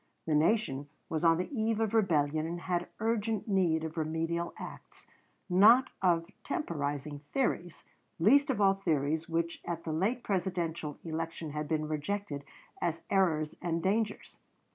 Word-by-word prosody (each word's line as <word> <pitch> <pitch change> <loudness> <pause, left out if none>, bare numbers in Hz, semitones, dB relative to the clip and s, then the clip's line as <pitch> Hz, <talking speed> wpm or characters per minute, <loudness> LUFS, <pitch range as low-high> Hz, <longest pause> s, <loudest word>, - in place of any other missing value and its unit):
The 160 - 0
nation 150 -4 +2 0.2
was 160 0 -2
on 165 -1 +5
the 185 - -3
eve 220 -1 +1
of 225 -1 0
rebellion 155 -7 +2
and 175 +1 -4
had 175 -1 -1
urgent 225 -1 0
need 175 -6 +2
of 160 +1 -5
remedial 165 +2 -1
acts, - - -10 0.4
not 220 +8 +6
of 170 -3 +3 0.2
temporizing 145 - -3
theories, 175 -10 -1 0.3
least 275 - +5
of 260 - 0
all 195 -1 +5
theories 160 -3 0
which 170 0 -1
at 170 -1 -4
the 160 - -3
late 215 +10 0
Presidential 170 -6 -2
election 165 -1 -4
had 150 0 -3
been 155 -1 0
rejected 155 0 -3 0.4
as 165 -1 -1
errors 160 -6 +2
and 170 -1 -1
dangers. 210 +2 -1
170 Hz, 145 wpm, -31 LUFS, 155-200 Hz, 0.4 s, not